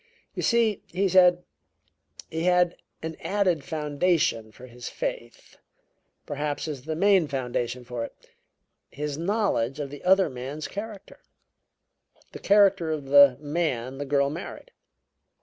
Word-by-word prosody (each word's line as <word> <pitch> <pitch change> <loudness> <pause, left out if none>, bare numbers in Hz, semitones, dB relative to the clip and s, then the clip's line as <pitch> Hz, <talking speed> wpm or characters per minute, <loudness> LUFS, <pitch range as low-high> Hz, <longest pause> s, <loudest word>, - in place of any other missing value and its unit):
"You - - -4
see," 230 -4 +2
he 195 +3 0
said, 180 -1 +5 0.9
"he 160 +1 -2
had 180 -1 +4
as - - -24 0.3
an 160 - -14
added 185 -7 0
foundation 150 -7 0
for 125 - -13
his 120 -1 -9
faith 120 0 -6 0.7
perhaps 145 +1 -3
as 140 -4 -6
the 160 0 -3
main 190 -1 +4
foundation 125 -2 -3
for 120 -1 -4
it - - -12 0.7
his 150 0 -5
knowledge 170 - 0
of 140 -2 -4
the 145 - -10
other 190 +1 +4
man's 135 +3 -6
character; 205 -1 -8 1.1
the - - -9
character 195 -4 +4
of 150 -3 -3
the 140 -2 +7
man 145 -5 -2
the 145 - -3
girl 140 0 +1
married. 175 - -8
155 Hz, 135 wpm, -26 LUFS, 135-185 Hz, 1.1 s, the